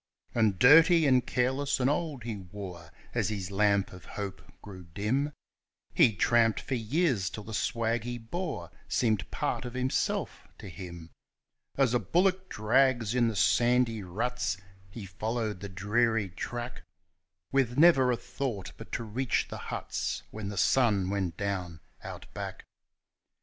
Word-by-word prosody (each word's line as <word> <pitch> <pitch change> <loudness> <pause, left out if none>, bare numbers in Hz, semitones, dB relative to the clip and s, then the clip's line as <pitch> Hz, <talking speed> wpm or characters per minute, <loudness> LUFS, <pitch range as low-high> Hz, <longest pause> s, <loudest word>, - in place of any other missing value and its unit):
And 110 -5 +2
dirty 160 - +7
and 130 -3 +3
careless 130 +3 0
and 125 - +2
old 145 -3 -1
he 115 -2 -4
wore, 90 -3 -9 0.2
as - - 0
his 100 -3 -4
lamp 100 -1 +2
of 90 -2 -12
hope 100 -2 -6 0.2
grew 95 -3 -10
dim; 130 +9 0 0.6
He 110 - +5
tramped 115 +3 +3
for - - -5
years 120 - +1
till 105 - -7
the 110 - -8
swag 115 +1 0
he 120 +1 -4
bore 160 +9 -5 0.2
seemed 110 -5 +1
part - - -2
of 125 -1 -7
himself 130 +1 -1
to 95 - -9
him. 85 -3 -9 0.7
As 135 -3 +3
a 125 - +3
bullock 185 +4 +1
drags 120 +1 +2
in 125 -2 +3
the 115 - -2
sandy 120 0 +3
ruts, 110 +3 -2 0.3
he 100 +1 -8
followed 110 +2 -3
the 100 +1 -6
dreary 105 +2 +1
track, 120 +7 -5 0.7
With 130 -2 +1
never 145 -6 +6
a 120 - 0
thought 120 -9 -4
but - - -11
to 115 - -2
reach 120 +4 -1
the - - -6
huts - - -3
when 105 -2 -5
the 100 - -6
sun 100 -3 +3
went 95 -5 -2
down 95 -5 -3 0.2
Out - - -8
Back. - - -6
115 Hz, 150 wpm, -29 LUFS, 100-125 Hz, 0.7 s, dirty